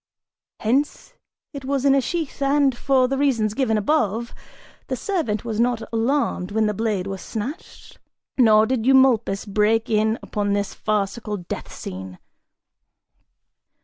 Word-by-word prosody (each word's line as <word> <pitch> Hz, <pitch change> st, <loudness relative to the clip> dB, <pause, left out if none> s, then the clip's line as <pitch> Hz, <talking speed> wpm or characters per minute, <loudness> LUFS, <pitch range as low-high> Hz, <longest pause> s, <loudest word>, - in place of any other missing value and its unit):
Hence 265 Hz, +7 st, -1 dB, 0.4 s
it 280 Hz, -2 st, -7 dB
was 275 Hz, 0 st, -1 dB
in 275 Hz, -, +5 dB
a 275 Hz, -, +3 dB
sheath 320 Hz, 0 st, -4 dB
and, 275 Hz, -1 st, +3 dB
for 260 Hz, 0 st, +2 dB
the 270 Hz, +1 st, -2 dB
reason 265 Hz, -6 st, +2 dB
given 220 Hz, 0 st, 0 dB
above, 230 Hz, -1 st, 0 dB, 0.5 s
the -, -, -2 dB
servant 300 Hz, -, -2 dB
was 225 Hz, -2 st, -3 dB
not 235 Hz, -1 st, +1 dB
alarmed 230 Hz, -5 st, 0 dB
when 220 Hz, +1 st, +1 dB
the 210 Hz, -, 0 dB
blade 210 Hz, -3 st, -1 dB
was 195 Hz, -2 st, -5 dB
snatched 245 Hz, -, -7 dB, 0.4 s
nor 220 Hz, -4 st, +5 dB
did 245 Hz, -1 st, -1 dB
Eumolpus 250 Hz, -6 st, +3 dB
break 215 Hz, +3 st, +1 dB
in 220 Hz, +1 st, +2 dB
upon 205 Hz, -1 st, -1 dB
this 200 Hz, 0 st, -1 dB
farcical 210 Hz, +1 st, -2 dB
death 175 Hz, -2 st, -7 dB
scene. 95 Hz, 0 st, -8 dB
225 Hz, 140 wpm, -22 LUFS, 210-270 Hz, 0.5 s, in